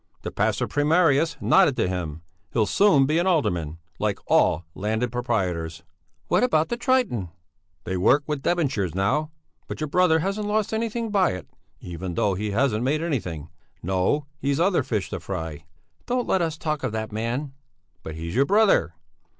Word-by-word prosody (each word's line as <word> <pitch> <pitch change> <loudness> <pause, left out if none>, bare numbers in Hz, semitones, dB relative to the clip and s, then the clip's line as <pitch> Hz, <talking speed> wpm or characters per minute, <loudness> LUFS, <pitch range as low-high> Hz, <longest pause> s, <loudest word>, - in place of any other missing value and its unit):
The - - -4
pastor - - 0
primarius 155 +1 +2
nodded 185 -8 +4
to - - +1
him. 85 -3 -4 0.3
He'll 110 -3 +3
soon 150 - +4
be 155 +4 +1
an 175 - +1
alderman, 90 - 0 0.2
like 105 -2 0
all 85 - +3
landed 110 +4 -1
proprietors." 90 -10 -2 0.4
"What 180 - +2
about 160 -10 +2
the 235 - -1
'Triton'?" 240 - 0 0.5
"They 95 - -3
work 135 +11 +4
with 150 -3 -3
debentures 130 - 0
now; 125 +11 +1 0.4
but - - -6
your 155 - -2
brother 180 0 +4
hasn't 195 +5 -2
lost 215 +1 0
anything 225 0 -2
by 195 -3 +3
it, 90 -2 -9 0.3
even 90 0 -6
though 100 +2 +1
he 105 +3 -3
hasn't 115 +1 +1
made 150 +5 0
anything. 90 - -3 0.3
No, 95 - 0
he's 140 +1 0
other 180 -2 +3
fish 110 -8 -3
to - - -3
fry!" 80 -5 -6 0.4
"Don't 245 0 0
let 190 - +2
us 160 -2 -1
talk 155 -2 -2
of 130 - -2
that 110 0 -3
man." 120 +6 -3 0.5
"But 80 - -7
he's 85 +1 -5
your 135 +5 +3
brother!" 195 - +3
135 Hz, 170 wpm, -24 LUFS, -, 0.5 s, nodded